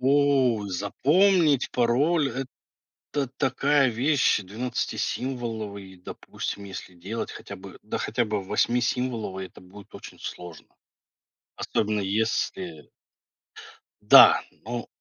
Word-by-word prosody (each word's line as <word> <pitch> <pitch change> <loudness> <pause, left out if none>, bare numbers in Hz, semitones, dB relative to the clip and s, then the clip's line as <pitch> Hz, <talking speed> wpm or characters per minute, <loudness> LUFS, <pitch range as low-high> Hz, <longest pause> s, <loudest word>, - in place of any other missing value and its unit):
О, 135 -5 +3
запомнить 150 - +2
пароль- 140 +6 +2 0.8
это 140 -3 -1
такая 135 +1 +2
вещь. 130 +2 +2
Двенадцатисимволовый, 110 -1 -4
допустим, 95 +2 -7
если 95 -1 -9
делать 100 +7 -5
хотя 100 - -9
бы, 95 0 -12
да 105 - -4
хотя 120 +2 -1
бы 105 -2 -2
восьмисимволовый, 115 -2 -1
это - - -17
будет 100 +3 -15
очень - - -11
сложно. 90 -3 -9 0.9
Особенно 105 0 -1
если. 110 - -2 1.1
Да, - - +8 0.2
но. 120 +1 -5
115 Hz, 95 wpm, -25 LUFS, 100-135 Hz, 1.1 s, Да